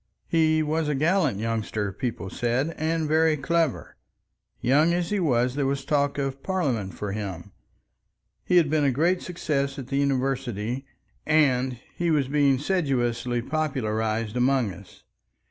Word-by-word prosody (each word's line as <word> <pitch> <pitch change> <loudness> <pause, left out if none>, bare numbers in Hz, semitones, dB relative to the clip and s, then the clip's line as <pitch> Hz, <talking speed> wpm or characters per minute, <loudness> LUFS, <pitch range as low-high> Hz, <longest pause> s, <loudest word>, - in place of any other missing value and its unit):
He 155 -1 +3
was 155 +1 0
a 150 - 0
gallant 155 - +2
youngster, 110 -2 -2
people 100 -2 -4
said, 125 +7 -1
and 160 0 -1
very 155 0 +3
clever. 160 - -1 0.6
Young 150 +7 +3
as 175 0 -2
he 205 - +1
was 125 -7 +2
there 140 0 0
was 135 0 -2
talk 145 -1 +1
of 135 -1 -3
parliament 130 - -1
for 105 -1 -4
him; 100 -2 -5 0.9
he 180 - +3
had 165 -3 +5
been 150 0 +1
a 140 - +4
great 170 +8 +1
success 140 -6 -2
at 130 -2 -7
the 135 - -1
university, 135 -3 -1 0.4
and 130 -5 +2 0.2
he 170 -1 0
was 145 -5 +2
being 140 -2 +3
sedulously 125 -7 0
popularized 115 -7 -1
among 125 -4 +2
us. 95 +1 -15
135 Hz, 145 wpm, -25 LUFS, 120-155 Hz, 0.9 s, had